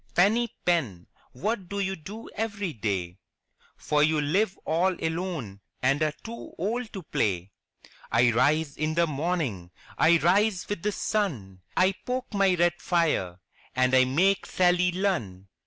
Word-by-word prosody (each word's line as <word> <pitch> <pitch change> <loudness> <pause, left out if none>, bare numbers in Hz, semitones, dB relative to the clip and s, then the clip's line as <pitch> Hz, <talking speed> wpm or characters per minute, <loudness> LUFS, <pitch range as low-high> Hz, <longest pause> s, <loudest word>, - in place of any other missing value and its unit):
* - - -34
Teeny 220 +6 +3
Pen, 130 - 0 0.3
what 190 - -3
do 200 - -3
you 190 -1 -1
do 200 +7 -9
every 205 -5 -3
day. 95 -5 -3 0.6
For 150 0 0
you 155 +1 +3
live 185 +7 +1
all 175 +4 +2
alone 160 - -3 0.2
and 135 +4 +1
are 155 -1 +1
too 230 +1 -9
old 220 +6 -2
to 190 - -6
play?" 95 - -1 0.6
'1 120 +1 +4
rise 145 +5 +2
in 155 +1 -1
the 170 0 +4
morning, 145 - -2 0.3
I 170 +2 +6
rise 190 +4 +2
with 205 -4 -3
the 210 - 0
sun, 130 - -2 0.2
I 185 +1 +5
poke 255 -1 -4
my 195 -2 +3
red 175 0 +1
fire 155 - 0 0.4
and 130 0 +2
I 130 0 +6
make 180 +10 +2
Sally 180 0 +3
Lunn 115 - -2
170 Hz, 155 wpm, -27 LUFS, 130-195 Hz, 0.6 s, I